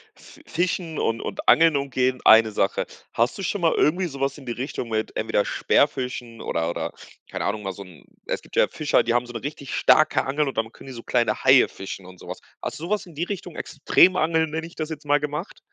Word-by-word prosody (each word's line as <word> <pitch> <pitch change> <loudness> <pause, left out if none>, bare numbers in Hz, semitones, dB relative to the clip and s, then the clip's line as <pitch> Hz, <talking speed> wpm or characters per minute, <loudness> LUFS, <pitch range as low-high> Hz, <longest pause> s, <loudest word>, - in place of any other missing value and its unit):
Fi - - -17
Fischen 175 -2 -2
und 115 0 0
und - - -6
Angeln 160 -2 +6
umgehen, 130 -2 0
eine 110 0 +7
Sache. 100 -2 0 0.3
Hast 120 +3 +1
du - - -5
schon 195 +2 -2
mal 165 -1 +3
irgendwie 180 +4 +2
sowas 135 -2 -3
in 140 - -12
die 120 - -4
Richtung 125 0 -4
mit 110 -1 -2
entweder - - 0
Speerfischen 125 -4 0
oder 80 0 -1
oder 85 - -3 0.4
keine - - -3
Ahnung, 105 - -2
mal 95 - -3
so 100 - -9
‘n 90 -6 -16 0.2
es - - -3
gibt - - -14
ja - - +5
Fischer, 150 -2 +1
die 115 - 0
haben 120 0 +1
so 120 - -10
‘ne 115 - -5
richtig 140 -1 -6
starke 155 - +4
Angel 145 +2 0
und 135 - -5
dann 110 0 -1
können - - -14
die 135 - -7
so 115 -1 -9
kleine 120 -1 0
Haie 130 -1 +7
fischen 95 -1 -8
und 90 -1 -13
sowas, - - -8 0.2
hast - - -5
du - - -9
sowas 210 +3 -1
in 170 -4 -15
die 160 - -2
Richtung, 180 -3 -6
Extrem-Angeln, 160 +1 +3
nenne 160 +1 -3
ich 170 - -16
das 155 -1 -4
jetzt 155 -1 -7
mal, 145 0 +3
gemacht? 150 +5 -5
140 Hz, 235 wpm, -24 LUFS, 115-160 Hz, 0.4 s, eine